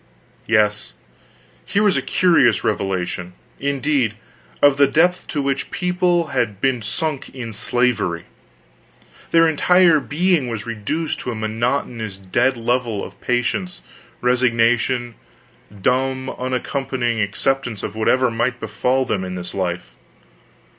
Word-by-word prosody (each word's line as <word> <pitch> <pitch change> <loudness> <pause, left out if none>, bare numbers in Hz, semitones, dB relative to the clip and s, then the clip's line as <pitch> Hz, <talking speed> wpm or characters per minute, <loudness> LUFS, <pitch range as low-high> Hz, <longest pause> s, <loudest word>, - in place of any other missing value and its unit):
Yes, 105 - +1 0.7
here 205 +1 0
was 205 -2 +3
a - - +1
curious 175 -9 +3
revelation, 95 -3 -2 0.3
indeed, 140 -4 0 0.4
of 145 -1 +5
the 140 0 +5
depth 175 +5 +2
to 145 -3 -2
which 140 0 -1
this - - -6
people 180 -2 +1
had 115 -6 -1
been 130 -1 +1
sunk 155 +4 -3
in 115 -3 -6
slavery. 105 -7 0 1.0
Their 165 0 +5
entire 170 +1 +4
being 160 0 +1
was 115 -3 -4
reduced 120 +8 -3
to 125 - -4
a - - -5
monotonous 110 -1 -2
dead 120 +7 +1
level 115 -2 -1
of - - -10
patience, 125 +9 -1 0.4
resignation, 120 0 +2 0.6
dumb 130 +6 -1
uncomplaining 130 -2 -2
acceptance 115 +2 -1
of 105 - -5
whatever 125 +3 +2
might 120 +2 -1
befall 125 +4 0
them 100 -6 -1
in 90 0 -5
this 90 -1 -6
life. 90 -9 -3
125 Hz, 125 wpm, -20 LUFS, 110-140 Hz, 1.0 s, of